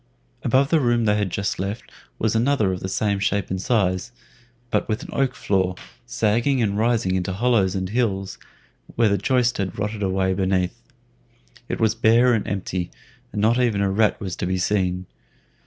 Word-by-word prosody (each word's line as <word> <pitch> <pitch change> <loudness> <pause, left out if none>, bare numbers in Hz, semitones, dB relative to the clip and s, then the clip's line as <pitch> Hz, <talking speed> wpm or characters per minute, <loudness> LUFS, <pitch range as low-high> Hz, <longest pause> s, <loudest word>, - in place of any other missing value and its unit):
Above 130 +3 +2
the 165 - +5
room 120 -3 +2
they 105 -1 +3
had 105 -2 0
just 100 +2 -2
left 100 +4 -4 0.3
was 110 0 0
another 115 -5 +2
of 90 - -4
the 95 - -5
same 100 +1 0
shape 100 -2 -1
and 95 0 -2
size, 95 -2 0 0.6
but - - 0
with 110 - -1
an - - -10
oak 135 -2 0
floor, 95 -2 0 0.3
sagging 115 +3 +1
and 105 -4 +1
rising 110 -3 +1
into 95 0 -1
hollows 100 -2 +2
and 95 -1 -2
hills, 100 -4 -1 0.6
where 115 -2 +3
the 100 - +2
joist 125 +2 +1
had 95 -2 -3
rotted 105 +1 -3
away 95 -1 +1
beneath. 95 -1 0 0.9
It - - -3
was 110 -1 +3
bare 115 +2 +4
and 110 - -1
empty, 95 -2 -3 0.4
and - - -4
not 115 +3 +3
even 115 -5 +1
a 100 -1 +1
rat 105 +2 +2
was 95 -3 -4
to - - -2
be 95 0 0
seen. 90 -1 0
105 Hz, 185 wpm, -23 LUFS, 95-115 Hz, 0.9 s, the